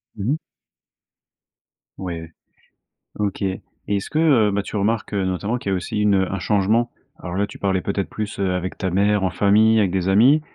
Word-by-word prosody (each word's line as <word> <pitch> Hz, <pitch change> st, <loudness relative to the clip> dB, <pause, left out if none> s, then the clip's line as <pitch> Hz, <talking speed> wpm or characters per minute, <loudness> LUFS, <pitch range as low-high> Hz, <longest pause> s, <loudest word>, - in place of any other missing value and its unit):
Mmh 105 Hz, +4 st, -2 dB
mh. 150 Hz, -, +1 dB, 1.6 s
Ouais, 85 Hz, -3 st, -6 dB, 0.9 s
OK. 100 Hz, -2 st, -2 dB
Et 95 Hz, -1 st, -2 dB, 0.3 s
est-ce, 100 Hz, +8 st, -2 dB
heu, 135 Hz, -10 st, +4 dB
bah 100 Hz, +1 st, 0 dB
que -, -, -13 dB
tu -, -, -6 dB
remarques, 105 Hz, +2 st, -1 dB
heu, 100 Hz, -2 st, 0 dB
notamment 100 Hz, +6 st, -1 dB
qu'il 100 Hz, -5 st, -3 dB
y -, -, +2 dB
a -, -, +2 dB
aussi 100 Hz, +4 st, -3 dB
une, 105 Hz, -1 st, +3 dB
heu, 95 Hz, -1 st, +1 dB
un 95 Hz, -, -2 dB
changement? 105 Hz, +5 st, +1 dB, 0.3 s
Alors 85 Hz, -, -6 dB
là, 100 Hz, +1 st, +1 dB
tu -, -, -11 dB
parlais 95 Hz, -2 st, 0 dB
peut-être 100 Hz, 0 st, -2 dB
plus 105 Hz, -1 st, -5 dB
heu, 95 Hz, -2 st, +1 dB
avec 90 Hz, 0 st, -3 dB
ta 95 Hz, -, -2 dB
mère, 100 Hz, +2 st, +2 dB
en 95 Hz, -, +1 dB
famille, 110 Hz, +2 st, +4 dB
avec 100 Hz, -3 st, +3 dB
des 95 Hz, 0 st, 0 dB
amis, 125 Hz, +10 st, +5 dB
100 Hz, 205 wpm, -22 LUFS, 95-105 Hz, 1.6 s, amis